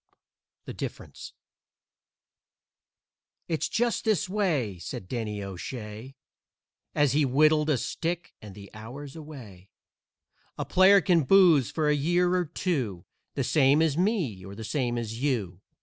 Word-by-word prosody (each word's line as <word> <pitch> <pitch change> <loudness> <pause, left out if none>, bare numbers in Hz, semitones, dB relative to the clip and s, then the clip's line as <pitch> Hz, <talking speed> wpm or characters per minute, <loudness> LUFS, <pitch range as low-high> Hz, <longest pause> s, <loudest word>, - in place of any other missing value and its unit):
THE - - -7
DIFFERENCE - - -8 2.1
"It's 160 -2 -1
just 235 +1 0
this 215 -2 +1
way," 160 - -1
said 90 +2 -7
Danny 105 -2 -4
O'Shay, 105 +5 -7 0.8
As 145 -3 +3
he 150 +3 +2
whittled 150 +3 +3
a 145 - +3
stick 170 +7 -4
and 105 -3 -11
the 100 -1 -12
hours 130 +7 -9
away, 120 - -11 0.9
"A - - -3
player 190 +2 +6
can 175 -2 +3
booze 160 - +5
for 155 -2 -1
a 150 - +4
year 175 +5 +1
or 180 -1 +1
two, 135 - -3 0.3
The - - 0
same 140 0 +3
as 155 -3 +1
me 170 - -1
or 100 +1 -9
the 110 - -8
same 120 +1 -1
as 115 0 -5
you. 105 -10 -2
140 Hz, 135 wpm, -27 LUFS, 110-170 Hz, 2.1 s, player